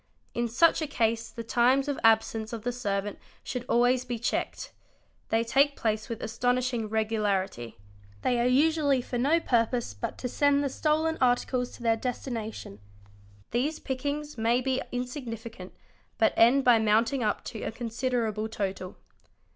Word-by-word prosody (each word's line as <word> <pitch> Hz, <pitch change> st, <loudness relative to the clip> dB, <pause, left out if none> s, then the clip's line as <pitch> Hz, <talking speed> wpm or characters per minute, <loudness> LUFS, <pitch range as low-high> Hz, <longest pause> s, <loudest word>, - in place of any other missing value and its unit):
In 235 Hz, 0 st, 0 dB
"such 320 Hz, +9 st, +3 dB
a 310 Hz, -, -1 dB
case 230 Hz, -4 st, 0 dB
the 230 Hz, -, -7 dB
times 250 Hz, +4 st, +2 dB
of 285 Hz, -, -2 dB
absence 225 Hz, 0 st, +2 dB
of 225 Hz, -2 st, -5 dB
the 245 Hz, -, -1 dB
servant 205 Hz, -4 st, -3 dB, 0.2 s
should 245 Hz, -1 st, -4 dB
always 245 Hz, +1 st, +3 dB
be 245 Hz, -2 st, -4 dB
checked. 230 Hz, -, -3 dB, 0.6 s
They 225 Hz, +1 st, +2 dB
take 280 Hz, +4 st, +3 dB
place 215 Hz, -1 st, -2 dB
with 230 Hz, -, -5 dB
astonishing 245 Hz, 0 st, 0 dB
regularity. 205 Hz, -, -1 dB, 0.5 s
They 245 Hz, -1 st, +2 dB
are 240 Hz, -, +2 dB
usually 285 Hz, 0 st, +3 dB
for 245 Hz, -, -3 dB
no 280 Hz, +6 st, +2 dB
ia 335 Hz, -, +4 dB
purpose 235 Hz, -, 0 dB
but 100 Hz, -, -5 dB
to 250 Hz, -, -3 dB
send 285 Hz, +3 st, +2 dB
the 280 Hz, -, 0 dB
stolen 315 Hz, +3 st, 0 dB
articles 250 Hz, 0 st, +1 dB
to 240 Hz, -, -11 dB
their 225 Hz, -1 st, +3 dB
destination. 225 Hz, -, -5 dB, 0.7 s
These 280 Hz, +7 st, 0 dB
pick 260 Hz, -2 st, -5 dB
ings 295 Hz, -2 st, -3 dB
may 230 Hz, +2 st, +2 dB
be 260 Hz, 0 st, -1 dB
insignificant 235 Hz, -6 st, -6 dB, 0.5 s
but 220 Hz, -, +3 dB
end 250 Hz, +4 st, +5 dB
by 245 Hz, -3 st, +6 dB
mounting 225 Hz, +5 st, +2 dB
up 210 Hz, -, -1 dB
to 220 Hz, -, -7 dB
a -, -, -3 dB
considerable 230 Hz, -2 st, -2 dB
total. 190 Hz, -3 st, -4 dB
240 Hz, 160 wpm, -28 LUFS, 220-260 Hz, 0.7 s, by